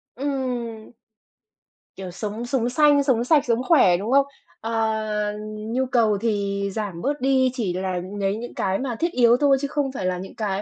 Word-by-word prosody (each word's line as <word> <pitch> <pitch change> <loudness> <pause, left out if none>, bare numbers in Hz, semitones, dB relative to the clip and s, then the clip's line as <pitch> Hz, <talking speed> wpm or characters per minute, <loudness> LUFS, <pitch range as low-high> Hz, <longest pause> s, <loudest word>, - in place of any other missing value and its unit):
Ừm. 250 -5 -4 1.1
Kiểu 185 -2 -7
sống 215 +5 -5
sống 245 -1 0
xanh, 290 +1 +4
sống 250 -4 +2
sạch, 290 +2 +3
sống 240 +1 +1
khỏe, 255 - +5
đúng 210 +6 -4
không? 275 +1 +5 0.4
À, 225 +1 -4 0.9
nhu 230 +5 -2
cầu 230 -5 +2
thì 200 -3 -1
giảm 200 -6 -4
bớt 285 0 -2
đi, 260 -1 +3
chỉ 220 -8 -2
là 185 0 -2 0.2
lấy 195 0 0
những 240 +2 -7
cái 190 0 -1
mà 255 -3 -3
thiết 340 +1 0
yếu 240 -3 +4
thôi 275 0 +4
chứ 285 - -1
không 280 -1 -1
phải 245 -8 -5
là 185 0 0
những 190 +2 -9
cái 200 -3 -2
235 Hz, 185 wpm, -23 LUFS, 200-265 Hz, 1.1 s, khỏe